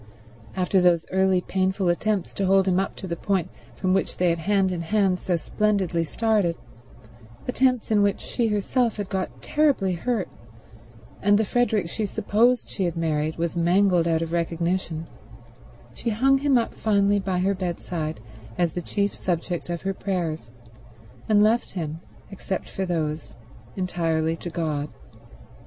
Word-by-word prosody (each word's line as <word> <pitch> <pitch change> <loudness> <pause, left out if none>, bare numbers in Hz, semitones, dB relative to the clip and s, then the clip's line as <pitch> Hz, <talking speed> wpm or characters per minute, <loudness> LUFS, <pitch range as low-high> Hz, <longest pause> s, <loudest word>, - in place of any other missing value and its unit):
After 185 0 +2
those 175 -2 +3
early 190 -1 +3
painful 190 +1 0
attempts 195 +2 0
to 195 - -1
hold 195 0 +4
him 185 0 +3
up 195 - -2
to - - -7
the 170 -2 -3
point 190 -1 -1 0.2
from 185 -1 0
which 195 - 0
they 180 -1 +3
had 165 - -1
hand 195 +2 +2
in 175 -2 -2
hand 190 +1 +1
so 180 - 0
splendidly 190 -2 0
started, 205 -1 +1 0.9
attempts 250 -2 +1
in 210 -1 +4
which 200 -1 +2
she 235 -2 -1
herself 225 +3 0
had 205 -2 -4
got 190 -1 -4
terribly 280 -11 +2
hurt 200 +1 -1 0.9
and 205 +1 +4
the 220 - +2
Frederick 220 -5 +1
she 210 +5 -2
supposed 235 +6 +2
she 190 - -2
had 170 -1 -2
married 155 -1 0
was 170 0 -2
mangled 175 0 +3
out 165 0 +1
of 165 - -5
recognition, 170 0 -1 0.9
she 235 - -3
hung 265 +5 +3
him 280 -2 +3
up 230 - -1
finally 205 -1 +2
by 190 -2 -1
her 190 +2 +2
bedside 170 - -4 0.4
as 175 -2 +2
the 175 - -4
chief 200 +3 -1
subject 175 -1 -3
of 170 -1 -3
her 195 0 -1
prayers, 170 - -3 0.8
and 210 -1 +5
left 225 +3 +2
him, 160 -3 -4 0.3
except 190 -1 -4
for 190 -1 -4
those, 155 -3 -2 0.4
entirely 165 -3 0
to 175 - -6
God. 155 -4 -2
185 Hz, 160 wpm, -24 LUFS, 170-205 Hz, 0.9 s, and